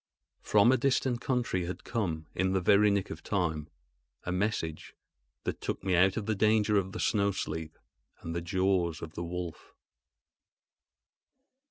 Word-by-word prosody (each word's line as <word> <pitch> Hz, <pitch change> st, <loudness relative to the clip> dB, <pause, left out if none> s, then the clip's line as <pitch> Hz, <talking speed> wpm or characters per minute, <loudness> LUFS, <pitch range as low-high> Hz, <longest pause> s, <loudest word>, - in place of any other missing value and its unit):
From 105 Hz, +3 st, +5 dB
a 130 Hz, -, +4 dB
distant 130 Hz, -2 st, +1 dB
country 120 Hz, -10 st, 0 dB
had 90 Hz, -, -6 dB
come, 85 Hz, -9 st, -2 dB
in 95 Hz, +1 st, 0 dB
the 95 Hz, -, +2 dB
very 100 Hz, +3 st, +5 dB
nick 100 Hz, -2 st, 0 dB
of -, -, -7 dB
time, 80 Hz, -7 st, -1 dB, 0.5 s
a 90 Hz, -, -3 dB
message 90 Hz, -5 st, -2 dB, 0.5 s
that -, -, -3 dB
took -, -, -3 dB
me 95 Hz, -1 st, 0 dB
out 95 Hz, +2 st, +4 dB
of 110 Hz, -, -2 dB
the 110 Hz, -, +1 dB
danger 105 Hz, 0 st, +3 dB
of 95 Hz, -1 st, +1 dB
the -, -, -6 dB
snow 100 Hz, -2 st, +2 dB
sleep 80 Hz, -4 st, -4 dB, 0.4 s
and 80 Hz, 0 st, -5 dB
the 85 Hz, -, -1 dB
jaws 90 Hz, -1 st, 0 dB
of 80 Hz, -1 st, -7 dB
the 85 Hz, -, -4 dB
wolf. 85 Hz, -1 st, -6 dB
95 Hz, 160 wpm, -30 LUFS, 85-105 Hz, 0.5 s, From